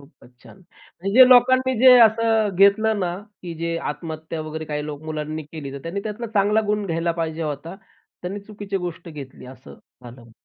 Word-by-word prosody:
खूपच 140 -3 -20
छान. - - -16
म्हणजे 185 +1 -10
जे 255 -1 +10
लोकांनी 260 +1 +5
जे 255 +2 +8
असं 225 -1 +4
घेतलं 205 +3 +4
ना, 175 -2 -2 0.3
की 175 -2 -7
जे 165 0 -2
आत्महत्या 160 +2 -7
वगैरे 155 0 -6
काही 150 -1 -4
लोक, 150 0 -7
मुलांनी 155 0 -5
केली, 150 -2 -9
तर 140 - -7
त्यांनी 175 +4 -4
त्यातला 220 +2 -5
चांगला 210 +2 +3
गुण 210 -1 -1
घ्यायला 165 0 -1
पाहिजे 160 0 -3
होता. 155 +4 -5 0.5
त्यांनी 190 +3 -5
चुकीची 205 -1 -6
गोष्ट 175 -1 -6
घेतली 140 -5 -10
असं 130 0 -13 0.3
झालं. 120 -1 -13
170 Hz, 180 wpm, -22 LUFS, 155-210 Hz, 0.5 s, जे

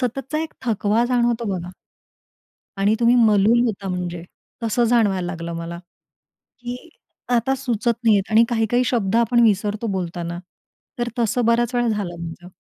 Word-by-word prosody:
सततचा 270 +4 -2
एक 320 - -6
थकवा 215 0 +1
जाणवतो 240 -1 +1
बघा. 180 +1 -7 1.1
आणि 200 +2 +2
तुम्ही 235 +1 +4
मलूल 220 0 +4
होता 200 -3 -3
म्हणजे. 175 -2 -4 0.4
तसं 230 +2 +1
जाणवायला 210 -6 +2
लागलं 170 -1 -5
मला 170 +1 -6 0.8
की 245 0 -5 0.6
आता 240 +3 +1
सुचत 240 -3 -1
नाहीहेत 210 -2 +3
आणि 225 +2 +6
काही-काही 235 +1 +1
शब्द 225 -4 0
आपण 235 +1 +3
विसरतो 210 +1 +1
बोलताना. 175 -2 -4 0.6
तर 240 - -1
तसं 235 +1 +1
बऱ्याच 235 +1 +2
वेळा 240 -1 +2
झालं 195 -6 -2
माझं. 170 +1 -9
220 Hz, 145 wpm, -21 LUFS, 190-240 Hz, 1.1 s, आणि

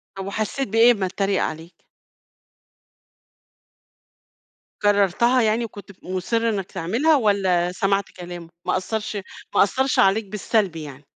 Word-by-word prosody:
طب 195 0 -6
وحسيت 215 +7 -2
بإيه 225 +4 +5
أمّا 200 -5 0
اتريق 195 +1 0
عليك؟ 165 +2 -7 3.0
كررتها 205 +5 +3
يعني 225 +1 +1
وكنت 205 -2 -11
ف - - -19
مُصّر 185 +5 -2
إنك 195 -4 -3
تعملها 240 - +2
والّا 190 -7 +2
سَمَعت 195 +2 +1
كلامه؟ 175 -2 -9 0.2
ما - - +1
أثرش 215 +3 -4 0.4
ما - - +7
أثرش 265 +6 0
عليك 200 +3 +4
بالسَلب 205 -2 -1
يعني؟ 145 -3 -9
200 Hz, 125 wpm, -22 LUFS, 180-220 Hz, 3.0 s, ما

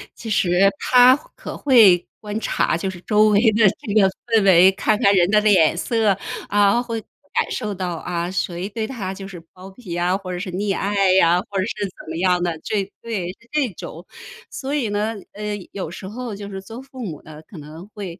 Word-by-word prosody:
其 225 - -8
实 190 -4 +1 0.3
他 250 +1 +6 0.2
可 - - -8
会 220 -10 +5
观 210 0 -5
察， 195 - 0
就 190 +3 -3
是 185 -2 -8
周 210 +1 +3
围 205 -1 +4
的 215 -1 +4
这 220 -8 -4
个 195 -3 +5 0.2
氛 225 -3 +3
围， 185 -1 +6
看 210 +2 0
看 200 - +5
人 175 -1 +3
的 210 +1 +4
脸 185 -7 +4
色， 215 -1 +1 0.3
啊， 205 +3 +3
会 230 -2 -4
感 285 +7 -5
受 210 -4 -3
到 180 -2 -3
啊， 170 +1 -4
谁 180 0 -3
对 220 +1 -4
他 205 -7 -5
就 195 0 -9
是 185 -3 -9
包 185 +1 -12
庇 190 -4 -9
啊， 175 +2 +1
或 190 -2 -8
者 175 - -4
是 185 0 -5
溺 195 +2 -1
爱 195 -2 +1
呀， 175 -2 +4
或 200 -1 -2
者 - - +1
是 210 -1 -3
怎 190 - -10
么 - - -5
样 180 0 +2
的， 170 -2 -2
这” 200 -2 -2
对， 215 -7 -4
是 230 - -26
这 295 -5 0
种。 170 +3 -9 0.4
所 270 +1 -5
以 270 -7 -1
呢， 210 +2 -1 0.2
呃， 210 0 -4 0.2
有 185 -5 -5
时 190 - -8
候 230 +1 -6
就 200 0 -8
是 195 -1 -6
做 225 +6 -10
父 265 -2 -9
母 160 -7 -7
的， 155 0 -13
可 190 - -12
能 155 +5 -11
会 190 -4 -7
200 Hz, 230 characters per minute, -21 LUFS, 180-220 Hz, 0.4 s, 他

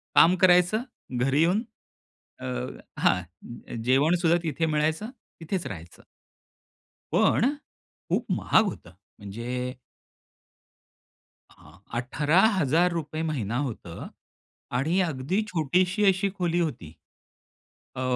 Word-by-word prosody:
काम 175 +3 +7
करायचं 180 +4 +5 0.4
घरी 135 +4 +2
येऊन 180 +7 +2 0.8
अ, - - -7 0.5
हां, 90 +6 -2
जेवण 135 +7 +3
सुद्धा 170 0 +4
तिथे 160 0 -1
मिळायचं, 155 +6 0 0.3
तिथेच 175 +2 -3
राहायचं. 85 -3 -10 1.1
पण 275 +4 +3 0.6
खूप - - 0
महाग 220 - +3
होतं. 180 - -6 0.3
म्हणजे 125 +5 -5 1.8
हां, - - -18 0.3
₹18,000 160 - +2
महिना 120 -5 -2
होतं. 90 -8 -8 0.7
आणि 160 +8 +1
अगदी 140 +10 -1
छोटीशी 180 +6 +1
अशी 190 +1 -1
खोली 175 -2 0
होती. 120 - -3 1.0
अ, 130 - -4
155 Hz, 95 wpm, -26 LUFS, 125-180 Hz, 1.8 s, काम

